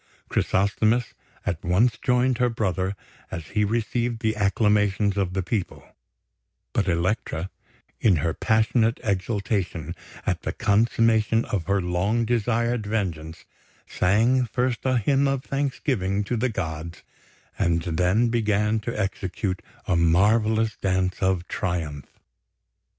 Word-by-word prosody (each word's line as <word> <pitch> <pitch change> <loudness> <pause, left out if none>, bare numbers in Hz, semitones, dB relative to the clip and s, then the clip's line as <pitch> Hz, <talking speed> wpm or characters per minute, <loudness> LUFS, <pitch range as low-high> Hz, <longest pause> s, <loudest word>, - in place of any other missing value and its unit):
Chrysosthemis 110 +5 +1 0.3
at 90 -3 -2
once 105 +7 +3
joined 125 -1 +2
her 125 0 +3
brother 95 -4 -1 0.3
as 80 -1 -6
he 105 -1 +1
received 115 +2 -1
the 110 0 +1
acclamations 105 -1 +2
of 95 -3 -1
the 95 - 0
people; 100 0 -3 0.9
but 100 - +1
Elektra, 85 0 -1 0.5
in 100 -5 +4
her 80 +1 0
passionate 110 +3 +2
exultation 95 -5 -2 0.3
at - - -1
the - - -3
consummation 115 +1 +2
of 90 -5 -2
her 100 0 +2
long 95 +6 0
desired 120 0 0
vengeance, 85 -7 -3 0.4
sang 115 +7 +2
first 125 0 -1
a 130 -1 +3
hymn 140 +5 +2
of 135 -1 -1
thanksgiving 130 -8 -1
to 110 +5 -2
the 125 +3 0
gods, 80 -4 -5 0.6
and 85 -1 +1
then 90 +7 +2
began 105 -1 +1
to 110 +1 -4
execute 95 -1 -2 0.2
a 90 - +1
marvellous 110 +6 +3
dance 95 -1 0
of 95 -2 +1
triumph. 80 -6 -3
105 Hz, 125 wpm, -24 LUFS, 90-115 Hz, 0.9 s, in